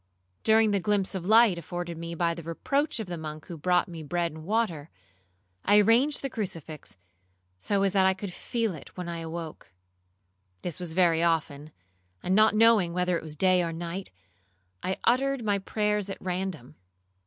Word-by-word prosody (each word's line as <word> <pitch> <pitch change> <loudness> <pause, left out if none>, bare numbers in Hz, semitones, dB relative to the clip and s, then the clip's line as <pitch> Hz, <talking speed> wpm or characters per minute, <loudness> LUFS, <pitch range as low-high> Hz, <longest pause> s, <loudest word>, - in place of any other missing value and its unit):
During 220 0 +4
the 200 - +2
glimpse 205 0 0
of 185 -2 -4
light 220 -4 +5
afforded 175 +1 -5
me 170 +1 -6
by 170 0 +1
the 165 -1 -8
approach 275 - -1
of 220 - -3
the 175 -2 -6
monk 155 0 -7
who 170 - -8
brought 180 +4 +1
me 170 -3 -8
bread 170 +3 -1
and 155 +1 -10
water, 175 -6 -1 0.7
I 205 - +5
arranged 235 +9 +4
the 275 - -2
crucifix 165 - -6 0.6
so 200 - 0
as 195 -1 +1
that 190 -1 +4
I 190 - +2
could 195 -1 -6
feel 225 +2 -2
it 155 - -12
when 180 -1 -5
I 170 -1 -4
awoke. 165 -1 -7 0.9
This 175 -1 -4
was 175 -3 -4
very 170 -2 +3
often, 155 -3 0 0.5
and 185 - 0
not 215 +2 +5
knowing 215 -6 +4
whether 180 0 +1
it - - -2
was 155 -1 -6
day 185 +2 +3
or 170 -1 -2
night, 170 +3 -5 0.7
I 185 - -2
uttered 265 0 +1
my 205 -1 +1
prayers 210 0 -1
at 195 - -5
random. 180 -7 -4
180 Hz, 180 wpm, -27 LUFS, 165-210 Hz, 0.9 s, light